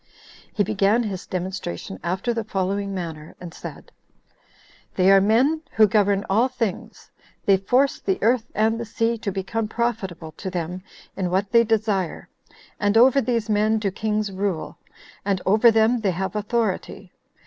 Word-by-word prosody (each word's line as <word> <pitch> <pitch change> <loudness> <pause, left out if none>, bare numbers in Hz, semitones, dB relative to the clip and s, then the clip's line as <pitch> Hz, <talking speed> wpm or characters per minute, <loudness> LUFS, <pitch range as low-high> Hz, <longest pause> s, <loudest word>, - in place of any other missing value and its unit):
He 205 - +1
began 210 +3 +2
his 195 -5 -5
demonstration 180 - -5
after 190 +8 -1
the 230 -1 -2
following 200 -1 -2
manner; 165 -5 -6
and 175 -2 -9
said, - - -10 1.0
"They 190 +1 +4
are 195 0 +7
men 255 +10 +3
who 220 - +6
govern 200 -1 +2
all 225 +6 +3
things; 235 -7 -5 0.3
they 195 -1 +5
force 250 +8 +1
the 190 - -1
earth 235 +1 +2
and 220 +1 +2
the 235 - -4
sea 230 +1 -1
to 205 -2 -3
become 205 +4 -3
profitable 205 -9 -3
to 190 - -5
them 180 0 -4 0.3
in 185 -2 -2
what 190 +2 0
they 235 -1 +6
desire, 215 -5 -1 0.5
and 205 +1 +2
over 260 +3 +6
these 230 -2 -1
men 215 +1 +2
do 205 -3 -1
kings 210 +1 -2
rule, 190 -4 -3 0.4
and 195 -2 0
over 215 +4 +5
them 225 +2 +3
they 210 -3 0
have 190 +4 -3
authority. 210 -1 -2
205 Hz, 160 wpm, -23 LUFS, 190-225 Hz, 1.0 s, are